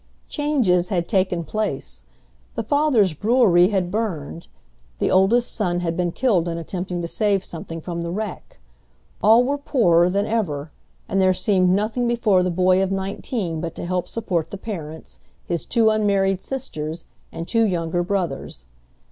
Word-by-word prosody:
Changes 250 - +1
had 175 -3 -1
taken 185 -4 +1
place. 135 - -4 0.5
The - - -2
father's 275 - +2
brewery 205 - +4
had 185 -3 -1
burned, 175 -7 -3 0.5
the - - 0
oldest 215 +6 +3
son 175 -5 -1
had 165 -1 -2
been 175 -1 0
killed 190 -6 +1
in 165 -1 -3
attempting 175 +1 -4
to - - -2
save 200 0 0
something 165 -1 -7
from 170 +1 -5
the 170 - -4
wreck, 210 +2 -5 0.6
all 225 +3 +6
were 280 +3 -1
poorer 175 - +3
than 200 +2 0
ever, 160 -10 -2 0.4
and 195 - +1
there 185 0 +3
seemed 185 0 +2
nothing 215 +6 +1
before 225 -6 +2
the 180 - 0
boy 185 +1 +3
of 195 0 0
nineteen 195 - -3
but 165 -1 -5
to - - -5
help 180 0 -2
support 175 -8 -2
the 200 - -6
parents, 160 -7 -8 0.3
his 170 -1 -3
two 225 -2 +3
unmarried 195 -3 +1
sisters, 165 - -5 0.3
and 165 - -6
two 230 -1 +2
younger 175 -4 0
brothers. 175 - -3
185 Hz, 160 wpm, -22 LUFS, 170-215 Hz, 0.6 s, all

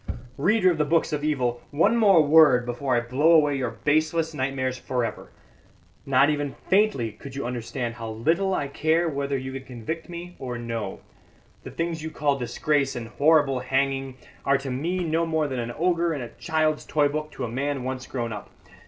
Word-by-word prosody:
"Reader 185 +4 +4
of 170 - -2
the - - +4
books 165 +1 +1
of 145 -1 -2
evil, 125 -6 0
one 170 +10 +3
more 200 -8 +6
word 145 -5 +6
before 125 +2 -1
I 120 - +2
blow 135 +8 +3
away 150 -3 +4
your 130 -3 -1
baseless 155 +6 0
nightmares 130 -2 -1
for 125 -2 -1
ever. - - -6 0.8
Not 135 +2 +4
even 145 -2 -2 0.2
faintly 190 - +3
could 135 +5 -11
you 140 - -3
understand 120 0 -3
how 115 -1 -7
little 165 - 0
I 140 - -1
care 160 +4 +1
whether 140 -2 -1
you 130 0 -5
can 135 - -5
convict 135 +8 -6
me 175 +1 -8
or 125 -2 -4
no. 115 -4 -5 0.6
The - - -9
things 165 -1 -3
you 160 - -4
call 145 -2 0
disgrace 140 +3 0
and 115 -1 -6
horrible 145 -1 +3
hanging 135 0 -1 0.3
are 140 0 +3
to 135 -1 -5
me 170 +8 -1
no 165 0 0
more 160 -2 0
than 130 -3 -3
an 120 0 -3
ogre 170 -2 +1
in 140 - -4
a 120 - -7
child's 155 +3 -1
toy 150 -1 +2
book 155 +1 -3
to - - -5
a - - -3
man 135 +3 -2
once 130 0 -4
grown 120 -3 -3
up. 105 - -8
140 Hz, 195 wpm, -25 LUFS, 125-160 Hz, 0.8 s, more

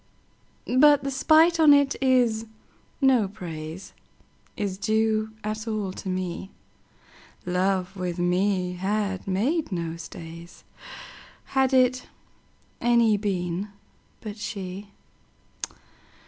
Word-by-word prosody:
But 295 0 +6
the 275 - -2
spite 320 +5 +4
on 305 -2 +8
't 285 -1 +3
is, 245 -4 +2 0.5
no 255 -6 +4
praiseIs 185 +2 -8
due 220 0 +1
at 215 +1 -4
all 215 -4 -2
to 190 - -6
me:Love 185 0 -4
with 180 -2 -3
me 180 +1 +1
had 195 +1 -2
made 245 - 0
no 170 -2 -3
stays, 170 +1 -10 0.9
Had 265 -1 +3
it 255 -1 +3 0.7
any 235 -2 +4
been 190 -2 -2 0.5
but 215 -1 -7
she. 195 -1 -6
205 Hz, 90 wpm, -25 LUFS, 180-240 Hz, 0.9 s, on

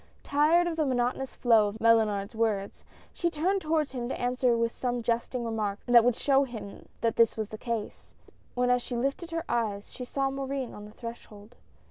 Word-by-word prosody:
Tired 310 +5 +3
of 335 -2 -2
the 310 - +2
monotonous 255 +1 -1
flow 225 -4 +4
of 205 +2 -6
Mellunard's 220 -2 +3
words, 215 -3 -1 0.3
she 345 - 0
turned 360 +5 0
toward 310 -2 0
him 245 -2 -4
to - - -4
answer 245 -1 +1
with 230 0 +1
some 245 -1 -2
jesting 235 +1 -1
remark 215 -3 -2
that 240 -1 +7
would 245 -1 +3
show 275 +1 +3
him 225 -6 -8
that 230 -1 0
this 230 -1 +4
was 215 -1 -3
the 215 - -7
case, 230 -3 -5 0.4
when 250 0 +2
as 250 0 +3
she 245 - -5
lifted 275 +7 -2
her 330 0 -3
eyes, 210 -4 -2
she 250 - -6
saw 270 +2 -1
Morin 270 -2 -4
on 210 - -9
the 210 - -12
threshold. 220 -2 -10
240 Hz, 195 wpm, -28 LUFS, 225-270 Hz, 0.4 s, that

